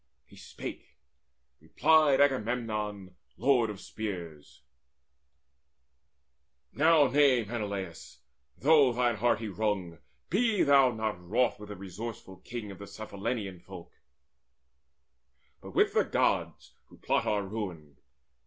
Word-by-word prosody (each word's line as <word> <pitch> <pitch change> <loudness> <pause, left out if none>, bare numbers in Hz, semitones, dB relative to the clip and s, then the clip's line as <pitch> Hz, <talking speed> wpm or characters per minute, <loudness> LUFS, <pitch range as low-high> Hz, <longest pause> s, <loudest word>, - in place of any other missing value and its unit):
He - - -19
spake; - - -9 0.6
replied 150 - +3
Agamemnon, 110 -7 -1 0.2
lord 125 -4 +3
of 105 -3 -7
spears: 85 -11 -7 2.1
"Now 155 0 +5
nay, 135 -2 +4
Menelaus, 100 -6 -6 0.4
though 145 -2 +5
thine 120 -2 +1
heart 120 +4 +2
he 110 - -4
wrung, 95 -4 -2 0.3
Be 215 +1 +2
thou 140 -2 +5
not 110 -5 -3
wroth 115 +8 +1
with 105 0 -10
the 105 - -6
resourceful 100 +1 -8
king 110 +2 -7
Of 95 - -11
Cephallenian 100 -1 -5
folk, 90 -1 -12 1.7
but - - -11
with - - +3
the - - +3
Gods - - -1
Who - - -19
plot - - 0
our 105 -1 +1
ruin. 90 -9 -6
110 Hz, 110 wpm, -29 LUFS, 95-125 Hz, 2.1 s, Now